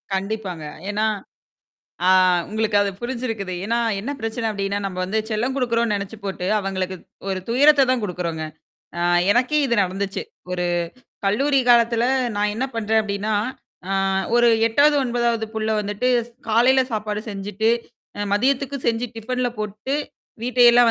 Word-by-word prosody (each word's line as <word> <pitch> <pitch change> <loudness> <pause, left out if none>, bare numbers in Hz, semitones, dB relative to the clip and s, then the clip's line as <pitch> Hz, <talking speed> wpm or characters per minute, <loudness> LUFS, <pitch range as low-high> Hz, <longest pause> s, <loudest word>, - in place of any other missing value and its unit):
கண்டிப்பாங்க. 190 -5 -4 0.3
ஏன்னா 215 +1 0 1.0
ஆ - - +5 0.4
உங்களுக்கு 215 0 0
அது 200 -1 +1
புரிஞ்சிருக்குது. 230 -6 -3
ஏன்னா, 230 +2 0 0.2
என்ன 255 +7 -4
பிரச்சனை 225 +1 -2
அப்படின்னா, 200 -1 -2
நம்ம 185 -2 -4
வந்து 210 +4 -1
செல்லம் 240 +5 0
குடுக்குறோம்னு 235 -3 +1
நெனச்சு 200 +2 -4
போட்டு, 190 -2 -4
அவங்களுக்கு 190 -1 -3 0.3
ஒரு 190 -1 -1
துயரத்த 280 +2 +5
தான் 255 -2 +2
குடுக்குறோங்க. 170 -4 -3 0.5
ஆ - - -1 0.3
எனக்கே 255 +5 +2
இது 235 - +1
நடந்துச்சு. 195 - -3 0.3
ஒரு 180 -1 -1 0.6
கல்லூரி 275 +7 +2
காலத்துல 235 0 +4 0.3
நான் 205 0 +1
என்ன 260 +4 -1
பண்றேன் 220 0 +2
அப்படின்னா, 205 +1 -2 0.6
அ - - -1 0.4
ஒரு 240 0 +5 0.2
8வது, 290 +5 +4
9வது 235 -2 0
புள்ள 220 0 -1
வந்துட்டு 205 +5 -1 0.4
காலையில 255 +4 +4
சாப்பாடு 210 -1 -2
செஞ்சுட்டு, 205 +3 -1 0.5
அ - - -3
மதியத்துக்கு 275 +4 +1
செஞ்சு 235 +1 0
டிஃபன்ல 250 +2 -2
போட்டு, 215 +7 -3 0.5
வீட்டையெல்லாம் 245 -1 +6
220 Hz, 135 wpm, -22 LUFS, 200-245 Hz, 1.0 s, வீட்டையெல்லாம்